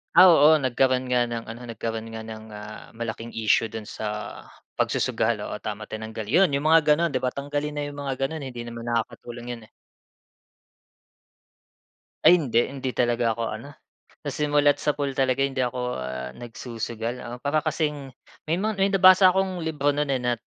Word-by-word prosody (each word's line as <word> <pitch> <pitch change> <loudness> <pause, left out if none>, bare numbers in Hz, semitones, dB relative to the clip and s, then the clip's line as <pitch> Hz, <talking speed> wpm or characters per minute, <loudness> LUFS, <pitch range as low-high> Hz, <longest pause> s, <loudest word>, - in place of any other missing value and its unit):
Ah, 185 - +10
oo, 155 -2 +7
nagkaroon 130 0 +1
nga 125 -1 +3
ng 120 -1 -4
ano 115 +2 -8
nagkaroon 115 0 -4
nga 115 - -6
ng, 110 0 -9
ah, 105 +1 -9
malaking 115 0 -6
issue 110 0 +1
dun 110 -2 -7
sa 110 - -7 0.7
pagsusugal, - - 0
oo - - -5
tama, 105 0 -5
tinanggal. 110 -1 -6
'Yun 170 - +4
'yung 140 +2 0
mga 160 0 +6
gano'n 150 0 +2
'di 130 - -1
ba, 125 - +1
tanggalin 145 +1 -3
na 145 0 -4
'yung 145 - -8
mga 140 -2 -4
gano'n 145 +3 -2
hindi 125 -3 -7
naman 115 0 -7
nakakatulong 120 +1 -4
'yun, 115 - -13
eh. - - -18 2.5
Ay 180 - +8
hindi, 120 -7 +1
hindi 135 -2 -4
talaga 120 -1 +1
ako 115 +1 -4
ano, 110 +6 -7 0.6
sa 145 - -2
simulat 145 -1 +2
sapol 145 -2 -1
talaga 135 0 +1
hindi 135 -1 -2
ako, 125 0 -1 0.2
ah, 65 0 -5
nagsusugal. 115 - -5
Ah, 120 +1 -7
para 140 +5 0
kasing, 150 -3 -2 0.4
may 165 - +2
mga 215 +4 0
may 195 - +4
nabasa 185 -1 +7
akong 190 -1 0
libro 150 -3 0
no'n, 145 0 -1
eh, 135 - +1
nat 120 -2 -1
130 Hz, 175 wpm, -25 LUFS, 115-145 Hz, 2.5 s, Ah